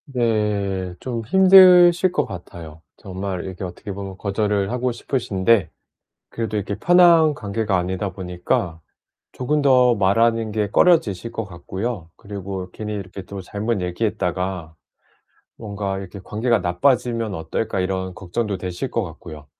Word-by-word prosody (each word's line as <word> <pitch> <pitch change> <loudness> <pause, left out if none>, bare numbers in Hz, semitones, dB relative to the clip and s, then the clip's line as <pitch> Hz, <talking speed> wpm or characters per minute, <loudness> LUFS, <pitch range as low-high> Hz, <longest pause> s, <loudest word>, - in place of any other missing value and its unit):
네 105 -7 -1
좀 120 -3 -4
힘드실 185 0 +7
것 - - 0
같아요. 85 -3 -10 0.2
정말 95 -2 -5
이렇게 95 0 -7
어떻게 90 +3 -7
보면 95 -1 -7
거절을 100 0 -1
하고 125 0 -1
싶으신데 115 - 0 0.6
그래도 110 -2 -3
이렇게 100 0 -2
편한 170 +1 +5
관계가 105 -3 -2
아니다 95 +2 -2
보니까 90 0 -2 0.5
조금 150 +4 -1
더 125 -3 +5
말하는 115 +3 +2
게 105 -1 -1
꺼려지실 115 - +3
것 115 - -3
같고요. 95 +1 -5
그리고 100 -2 -7
'괜히 105 -1 -5
이렇게 95 -1 -7
또 95 0 -8
잘못 105 +3 -2
얘기했다가 90 -3 -2 0.8
뭔가 100 -3 -4
이렇게 95 +1 -8
관계가 115 +3 0
나빠지면 115 +4 0
어떨까?' 80 +6 -3
이런 95 0 -2
걱정도 100 +2 -3
되실 90 -1 -4
것 - - -1
같고요. 75 -3 -10
100 Hz, 310 characters per minute, -21 LUFS, 95-115 Hz, 0.8 s, 힘드실